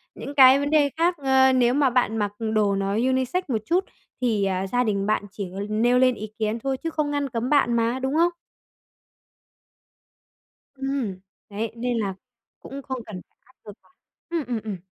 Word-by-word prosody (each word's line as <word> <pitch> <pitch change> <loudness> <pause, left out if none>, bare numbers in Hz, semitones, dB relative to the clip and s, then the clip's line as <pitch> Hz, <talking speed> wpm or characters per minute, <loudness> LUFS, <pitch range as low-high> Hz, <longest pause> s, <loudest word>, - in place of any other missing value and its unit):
những 285 - -8
cái 265 0 +8
vấn 285 0 -1
đề 300 -2 +3
khác, 345 +2 +2
ờ, 265 -2 +4
nếu 245 -1 +3
mà 280 -1 +3
bạn 240 -3 +1
mặc 205 -2 -1 0.2
đồ 205 -2 +2
nó 195 0 -1
unisex 260 - 0
một 230 -6 -1
chút 365 - +1 0.4
thì, 220 -5 +1
à, 190 0 -1
gia 245 +5 +1
đình 200 -4 -1
bạn 215 0 0
chỉ 195 -2 -6 0.2
nêu 240 +4 +2
lên 255 -1 +4
ý 215 - -6
kiến 220 +1 -1
thôi 265 +3 -2
chứ 330 - -4
không 305 -2 -2
ngăn 285 -1 -1
cấm 235 +2 -3
bạn 280 -5 +3
mà, 235 +2 0
đúng 265 +2 -2
không? 340 +2 +3 2.4
Ừm, 270 -8 -3 0.3
đấy, 215 +2 -4
nên 245 0 -1
là 200 -4 -1 0.5
cũng 275 +1 -8
không 260 -2 -5
cần 190 -4 -8
phải - - -45
áp 260 - -27
lực 210 - -9
quá. - - -29 0.4
Ừm, 335 -4 -2
ừm, 235 -3 -3
ừm. 210 -3 -5
250 Hz, 195 wpm, -24 LUFS, 215-275 Hz, 2.4 s, cái